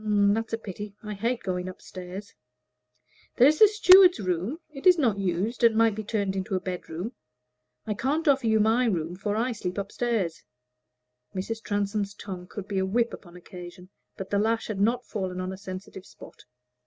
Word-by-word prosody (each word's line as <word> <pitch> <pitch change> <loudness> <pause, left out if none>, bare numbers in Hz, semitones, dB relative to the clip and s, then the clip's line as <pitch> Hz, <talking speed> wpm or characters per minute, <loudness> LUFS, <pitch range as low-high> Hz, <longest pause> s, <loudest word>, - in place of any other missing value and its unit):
"That's 210 +1 +2
a 225 - 0
pity. 205 -1 -8
I 210 0 -5
hate 230 +4 -2
going 180 -1 -2
up 185 - -10
stairs." 185 +2 -9 1.0
"There 250 - +7
is 305 +1 +3
the 430 - +10
steward's 375 - +7
room: 185 - -2
it 285 +4 -2
is 360 -1 +8
not 230 -10 +1
used, 195 +6 -1
and 230 -1 +6
might 225 -1 +4
be 215 +1 -5
turned 200 -2 -1
into 190 0 -2
a - - +1
bedroom. 185 +3 -5 0.7
I 215 - -1
can't 290 - -1
offer 270 -4 +3
you 220 0 +3
my 225 +4 +3
room, 175 -6 -1
for 205 +2 -2
I 235 +4 0
sleep 185 -5 -4
up 200 0 -4
stairs." 225 -9 -1 0.9
(Mrs. 220 +4 -3
Transome's 205 -1 -2
tongue 185 -3 -8
could 200 0 -8
be 195 -2 -1
a - - +1
whip 230 +5 0
upon 175 -2 -11
occasion, 180 0 -11 0.3
but 195 - -7
the 200 - +2
lash 225 +2 +1
had 205 -3 -3
not 235 +4 +1
fallen 185 -4 -4
on 185 +1 -3
a - - -5
sensitive 190 0 -8
spot.) - - -15
205 Hz, 190 wpm, -27 LUFS, 185-230 Hz, 1.0 s, the